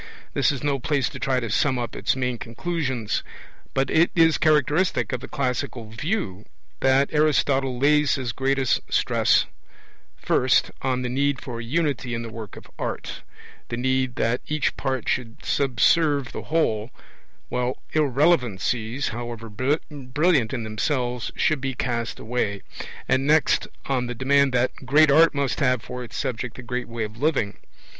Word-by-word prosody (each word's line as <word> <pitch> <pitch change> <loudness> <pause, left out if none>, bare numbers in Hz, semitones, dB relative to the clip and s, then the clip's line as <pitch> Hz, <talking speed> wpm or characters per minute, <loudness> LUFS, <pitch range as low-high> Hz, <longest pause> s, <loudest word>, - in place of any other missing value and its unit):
This - - +3
is 140 -1 -5
no 140 -2 +1
place 140 +1 0
to - - -8
try 130 -2 +1
to 115 -4 -4
sum 130 +4 +2
up 120 -1 -4
its - - 0
main 125 -2 -2
conclusions. 130 -2 -2 0.5
But 135 0 +1
it 165 +2 +4
is 165 -2 +4
characteristic 155 +2 +2
of 125 - -1
the - - -8
classical 125 -4 -3
view 110 - -3 0.3
that 135 +1 +3
Aristotle 135 -3 +2
lays 150 +2 +3
his 130 -4 -3
greatest 135 +1 +1
stress, - - +3 0.7
first, - - +2
on 130 -1 0
the 125 - -2
need 140 +1 +1
for 120 -3 -6
Unity 135 -1 -1
in 115 - -4
the 115 - -7
work 110 -2 -8
of - - -11
art, - - -4 0.5
the 120 - -3
need 130 0 0
that 115 +2 0
each 150 -1 0
part 130 -4 -2
should 115 -2 -2
subserve 140 +2 +2
the - - -7
whole, 115 -9 0 0.6
while 125 +1 -1 0.2
irrelevancies, 130 - +1
however 115 -1 -6
brilliant 140 - 0
in 115 - -3
themselves, 120 +2 -2
should 155 -4 +1
be 135 -1 -2
cast 115 -2 -2
away; 110 -4 -2 0.4
and 135 +2 +1
next, 155 0 +3 0.2
on 130 -2 0
the 125 - -4
demand 140 +2 +3
that 125 0 +2
great 145 +3 +5
art 160 +2 +6
must 140 -3 0
have 125 -5 +2
for 125 0 -6
its 115 - -8
subject 125 -1 -3
the 125 - -9
great 125 +1 -3
way 115 -1 -4
of 110 +1 -6
living. 135 -10 +1
130 Hz, 160 wpm, -24 LUFS, 120-145 Hz, 0.7 s, art